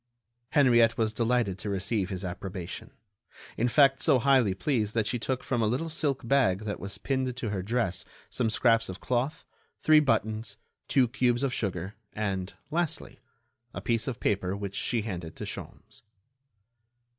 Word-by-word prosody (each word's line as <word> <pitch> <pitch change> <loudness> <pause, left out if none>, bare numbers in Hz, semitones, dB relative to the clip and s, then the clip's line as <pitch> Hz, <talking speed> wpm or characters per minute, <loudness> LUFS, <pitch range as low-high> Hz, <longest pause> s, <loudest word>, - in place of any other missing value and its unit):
Henriette 120 -6 +5
was 110 -2 +1
delighted 115 -4 +1
to 105 - -4
receive 100 0 0
his 95 -1 -4
approbation, 90 0 -6 0.7
in 120 - +1
fact 135 +1 +4
so 145 -5 +5
highly 125 -6 +3
pleased 110 +1 -1
that 110 -2 +2
she 120 +3 -1
took 130 +2 -2
from 120 -3 0
a 110 - +2
little 130 +9 -1
silk 145 -6 -1
bag 115 -8 +3
that 105 -1 -4
was 100 0 -6
pinned 130 +2 -1
to 120 -4 -2
her 95 -2 -2
dress 110 -2 -1 0.2
some 120 -3 -1
scraps 115 -1 +3
of 95 - -6
cloth, 130 +4 -1 0.3
three 155 -1 +6
buttons, 110 -5 0 0.3
two 130 -3 +4
cubes 120 +1 +1
of 135 -3 0
sugar 95 -2 -3 0.2
and, 95 -3 -3 0.2
lastly, 170 0 -2 0.6
a - - -3
piece 115 +1 0
of 125 -2 -3
paper 100 -1 0
which 100 -1 -5
she 115 -3 0
handed 85 -6 -5
to - - -7
Sholmes. - - -8
115 Hz, 165 wpm, -28 LUFS, 100-130 Hz, 0.7 s, three